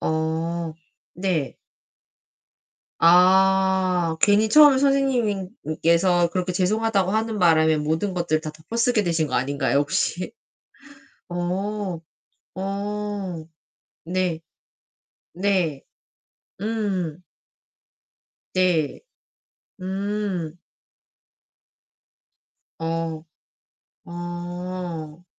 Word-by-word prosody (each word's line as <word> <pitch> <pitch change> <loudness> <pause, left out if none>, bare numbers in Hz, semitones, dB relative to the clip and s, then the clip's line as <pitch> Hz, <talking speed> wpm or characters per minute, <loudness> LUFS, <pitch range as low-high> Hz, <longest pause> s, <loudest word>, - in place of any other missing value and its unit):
어 160 +1 -2 0.4
네. 175 -6 -2 1.4
아 185 -1 +4
괜히 205 +2 +4
처음에 295 +2 +8
선생님께서 190 - +1
그렇게 185 0 -2
죄송하다고 195 +1 +1
하는 220 0 -1
바람에 160 -3 +4
모든 160 +6 -1
것들을 170 -3 0
다 155 -1 -5
덮어쓰게 220 +8 0
되신 165 -3 0
거 - - -4
아닌가요, 140 +2 +1
혹시? 155 +5 -1 1.0
어 185 +1 -3 0.6
어 200 -2 -4 0.6
네. 180 -2 -1 0.9
네 180 -6 0 0.8
음. 195 -6 -2 1.3
네. 180 -5 +1 0.8
음. 190 -3 -3 2.2
어. 165 -1 -3 0.8
어. 175 -1 -6
180 Hz, 130 characters per minute, -23 LUFS, 165-200 Hz, 2.2 s, 처음에